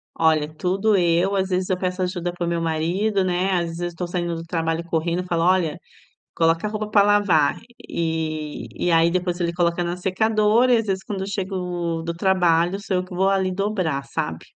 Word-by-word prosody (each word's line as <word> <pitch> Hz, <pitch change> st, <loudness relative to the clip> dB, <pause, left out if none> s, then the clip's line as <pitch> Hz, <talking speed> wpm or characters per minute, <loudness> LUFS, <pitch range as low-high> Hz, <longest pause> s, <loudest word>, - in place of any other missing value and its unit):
Olha, 155 Hz, -1 st, +2 dB
tudo 195 Hz, +6 st, +1 dB
eu. 175 Hz, +3 st, +2 dB
Às 190 Hz, 0 st, 0 dB
vezes 185 Hz, 0 st, -1 dB
eu 185 Hz, -, +1 dB
peço 185 Hz, 0 st, -2 dB
ajuda 180 Hz, -1 st, -2 dB
para 175 Hz, -1 st, -3 dB
o -, -, -1 dB
meu 170 Hz, -1 st, -1 dB
marido, 180 Hz, +6 st, 0 dB
né? 185 Hz, +1 st, 0 dB
Às 175 Hz, -1 st, +1 dB
vezes 175 Hz, 0 st, -3 dB
eu -, -, -20 dB
tô 180 Hz, 0 st, -4 dB
saindo 175 Hz, -1 st, -2 dB
do 165 Hz, -, -6 dB
trabalho 165 Hz, 0 st, -2 dB
correndo, 170 Hz, +1 st, -1 dB
eu -, -, -8 dB
falo: 170 Hz, -2 st, 0 dB
"Olha, 180 Hz, -4 st, +2 dB, 0.6 s
coloca 165 Hz, +4 st, +2 dB
roupa 215 Hz, 0 st, -4 dB
pra 210 Hz, -1 st, +5 dB
lavar". 200 Hz, -8 st, +3 dB, 0.3 s
E 160 Hz, -2 st, -3 dB
e 175 Hz, -, 0 dB
aí, 165 Hz, 0 st, +5 dB
depois 180 Hz, 0 st, -1 dB
ele 170 Hz, -1 st, -1 dB
coloca 175 Hz, 0 st, +1 dB
na 175 Hz, +1 st, -2 dB
secadora 215 Hz, +5 st, +2 dB
e, -, -, +5 dB
às 225 Hz, -, -1 dB
vezes, 190 Hz, -1 st, -2 dB
quando 195 Hz, -2 st, -4 dB
eu 190 Hz, -, -3 dB
chego 180 Hz, -4 st, -3 dB
do 170 Hz, 0 st, -3 dB
trabalho, 175 Hz, 0 st, +2 dB
sou 195 Hz, -2 st, -2 dB
eu 180 Hz, -, -2 dB
que 185 Hz, -, -11 dB
vou 190 Hz, +1 st, +2 dB
ali 190 Hz, -1 st, +1 dB
dobrar, 185 Hz, -8 st, -1 dB
sabe. 80 Hz, -11 st, -4 dB
180 Hz, 210 wpm, -22 LUFS, 165-190 Hz, 0.6 s, pra